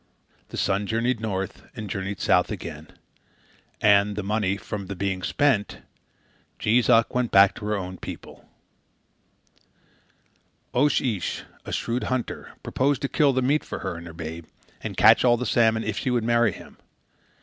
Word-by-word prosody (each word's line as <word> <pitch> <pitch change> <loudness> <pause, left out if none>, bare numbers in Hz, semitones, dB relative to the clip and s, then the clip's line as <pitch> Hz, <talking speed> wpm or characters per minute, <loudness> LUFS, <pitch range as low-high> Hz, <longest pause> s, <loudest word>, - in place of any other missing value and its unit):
The - - -7
sun 100 +1 0
journeyed 115 +2 0
north, 95 -4 -4
and 110 -3 -6
journeyed 95 0 -4
south - - +3
again; - - -7 0.9
and, 100 -1 +4
the 105 - -3
money 100 -1 0
from 100 -1 -6
the 100 - -5
being 95 0 -2
spent, 115 - +1 0.8
Jees 115 +3 +2
Uck 115 0 +4
went 125 -2 0
back 100 0 +6
to 105 - -7
her 105 - 0
own 95 -2 -5
people. - - -10 2.2
Oche 145 +4 +3 0.2
Ish, 90 - -4 0.2
a - - -6
shrewd 120 +2 -2
hunter, 130 -2 -3
proposed 140 +1 0
to 140 - 0
kill 145 -3 +3
the 130 -1 0
meat 145 +4 +2
for - - -6
her - - -2
and 85 +1 -9
her 80 - -9
babe, 80 0 -7 0.3
and - - -6
catch - - +7
the 120 0 +3
salmon, 110 -1 +2
if 110 -1 -2
she - - -2
would 120 -2 +1
marry 115 -1 +3
him. - - -13
110 Hz, 160 wpm, -25 LUFS, 95-120 Hz, 2.2 s, catch